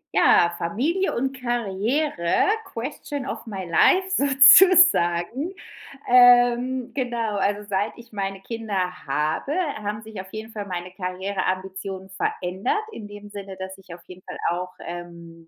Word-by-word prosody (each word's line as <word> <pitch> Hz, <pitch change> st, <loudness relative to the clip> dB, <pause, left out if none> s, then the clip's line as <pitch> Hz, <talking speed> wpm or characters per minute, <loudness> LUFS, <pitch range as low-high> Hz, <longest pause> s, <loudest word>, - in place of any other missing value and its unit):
Ja, 170 Hz, 0 st, +4 dB
Familie 290 Hz, -, -1 dB
und 265 Hz, +2 st, -2 dB
Karriere, 235 Hz, -, 0 dB, 0.2 s
question 275 Hz, +3 st, -6 dB
of 235 Hz, -, -6 dB
my 195 Hz, -4 st, -5 dB
life 375 Hz, -, +3 dB
sozusagen, 280 Hz, -, +5 dB, 0.5 s
ähm, 245 Hz, 0 st, +4 dB
genau, 235 Hz, -5 st, -2 dB
also 205 Hz, +1 st, -1 dB
seit 200 Hz, +1 st, -1 dB
ich 235 Hz, -1 st, -15 dB
meine 195 Hz, -1 st, -4 dB
Kinder 225 Hz, -1 st, -5 dB, 0.3 s
habe, 150 Hz, -, -1 dB, 0.3 s
haben 210 Hz, +1 st, -5 dB
sich 215 Hz, -3 st, -8 dB
auf 190 Hz, 0 st, -15 dB
jeden 220 Hz, +1 st, -8 dB
Fall 205 Hz, -2 st, -6 dB
meine 180 Hz, -1 st, -5 dB
Karriereambitionen 190 Hz, 0 st, -4 dB
verändert 190 Hz, -, -2 dB
in 215 Hz, -, -9 dB
dem 205 Hz, 0 st, -11 dB
Sinne, 200 Hz, -2 st, -9 dB
dass 190 Hz, 0 st, -7 dB
ich 185 Hz, -2 st, -16 dB
auf 175 Hz, -, -17 dB
jeden 185 Hz, 0 st, -13 dB
Fall -, -, -9 dB
auch, 180 Hz, +1 st, -4 dB
ähm, 170 Hz, -1 st, -10 dB
205 Hz, 135 wpm, -23 LUFS, 185-245 Hz, 0.5 s, sozusagen